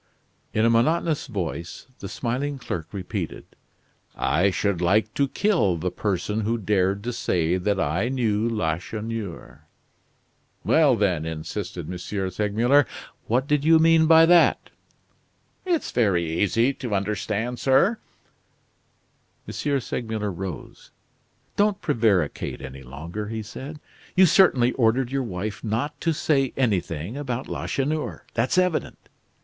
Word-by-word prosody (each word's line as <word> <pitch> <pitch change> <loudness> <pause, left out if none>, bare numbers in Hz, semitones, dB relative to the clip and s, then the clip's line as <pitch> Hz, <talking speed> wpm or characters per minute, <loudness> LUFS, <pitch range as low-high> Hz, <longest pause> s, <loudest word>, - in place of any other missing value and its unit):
In 110 - +2
a - - +5
monotonous 155 +6 +1
voice, 90 - -5
the 100 - -7
smiling 130 +6 -2
clerk 90 - -5
repeated: 95 -3 -5 0.7
"I 90 +7 +2
should 95 -2 -1
like 105 +5 +2
to 140 - +1
kill 165 - +1
the 90 +2 -2
person 105 +2 -2
who 115 +2 0
dared 100 -1 0
to 120 +1 -3
say 90 -6 0
that 100 +2 0
I 95 +9 0
knew 115 -4 0
Lacheneur." 95 - -4 1.0
"Well, 150 -5 +4
then!" 90 -7 0
insisted 85 +3 -5
M. 90 -1 -5
Segmuller, 105 +8 +1 0.4
"what 125 +4 +1
did 145 0 +1
you 160 +1 +6
mean 160 0 +5
by 165 0 +8
that?" 175 0 +4 1.0
"It's 345 -4 0
very 95 -8 +2
easy 115 +9 +2
to 120 -6 -3
understand, 105 +4 -2
sir." 155 - +3 1.5
M. - - -6 0.3
Segmuller 110 -4 -3
rose. 90 -2 -7 0.7
"Don't 205 -1 +2
prevaricate 110 - 0
any 65 0 -8
longer," 80 +11 -6
he 110 0 -4
said. 135 +7 -8 0.4
"You 190 0 +7
certainly 140 -9 +5
ordered 120 +1 +1
your 135 0 0
wife 105 -2 -5
not 115 +7 -2
to 165 - +1
say 140 -4 +1
anything 100 - -1
about 130 -3 -4
Lacheneur. 150 +3 -3
That's 120 +8 0
evident. 180 -3 +1
110 Hz, 125 wpm, -24 LUFS, 95-135 Hz, 1.5 s, by